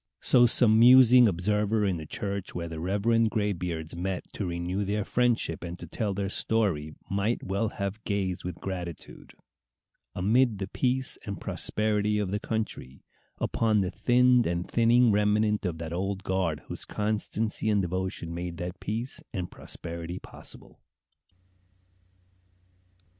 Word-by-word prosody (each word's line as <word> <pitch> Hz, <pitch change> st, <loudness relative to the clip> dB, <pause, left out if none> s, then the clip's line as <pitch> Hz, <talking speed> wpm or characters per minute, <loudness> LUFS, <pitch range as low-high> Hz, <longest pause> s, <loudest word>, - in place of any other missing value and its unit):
So 120 Hz, -1 st, +5 dB
some 110 Hz, -2 st, +5 dB
musing 125 Hz, 0 st, +8 dB
observer 105 Hz, +3 st, +1 dB
in 95 Hz, -3 st, 0 dB
the 80 Hz, -1 st, -8 dB
church 100 Hz, +1 st, -4 dB
where 85 Hz, -1 st, -3 dB
the 80 Hz, -1 st, -6 dB
reverend 105 Hz, +6 st, +2 dB
graybeards 90 Hz, -7 st, -2 dB
met 90 Hz, +1 st, -3 dB
to 100 Hz, -, -3 dB
renew 90 Hz, +3 st, -2 dB
their 100 Hz, +1 st, -1 dB
friendship 120 Hz, -10 st, 0 dB
and 85 Hz, 0 st, -6 dB
to 85 Hz, -, -9 dB
tell 100 Hz, +4 st, -3 dB
their 100 Hz, 0 st, -2 dB
story 95 Hz, -8 st, -1 dB
might 100 Hz, +4 st, -1 dB
well 100 Hz, +3 st, -1 dB
have 100 Hz, 0 st, -5 dB
gazed 95 Hz, -3 st, -2 dB
with 90 Hz, -1 st, -6 dB
gratitude, 90 Hz, -4 st, -7 dB, 0.8 s
amid 110 Hz, +4 st, +2 dB
the 95 Hz, -1 st, -4 dB
peace 130 Hz, +5 st, -1 dB
and 100 Hz, -, -4 dB
prosperity 105 Hz, -1 st, 0 dB
of 100 Hz, -3 st, -1 dB
the 105 Hz, -, -1 dB
country, 105 Hz, -, -4 dB, 0.4 s
upon 110 Hz, -2 st, +1 dB
the 90 Hz, -1 st, -1 dB
thinned 125 Hz, +3 st, +4 dB
and 85 Hz, +1 st, -2 dB
thinning 120 Hz, 0 st, +4 dB
remnant 105 Hz, 0 st, +2 dB
of 85 Hz, -2 st, -4 dB
that 80 Hz, 0 st, -5 dB
old 95 Hz, +2 st, -2 dB
guard 90 Hz, -6 st, -1 dB
whose -, -, -5 dB
constancy 110 Hz, +1 st, -1 dB
and 105 Hz, -2 st, +2 dB
devotion 90 Hz, -1 st, -3 dB
made 85 Hz, 0 st, -5 dB
that 90 Hz, +2 st, -5 dB
peace 115 Hz, +5 st, -3 dB
and 90 Hz, -4 st, -4 dB
prosperity 85 Hz, +1 st, -6 dB
possible. -, -, -11 dB
100 Hz, 140 wpm, -28 LUFS, 90-110 Hz, 0.8 s, musing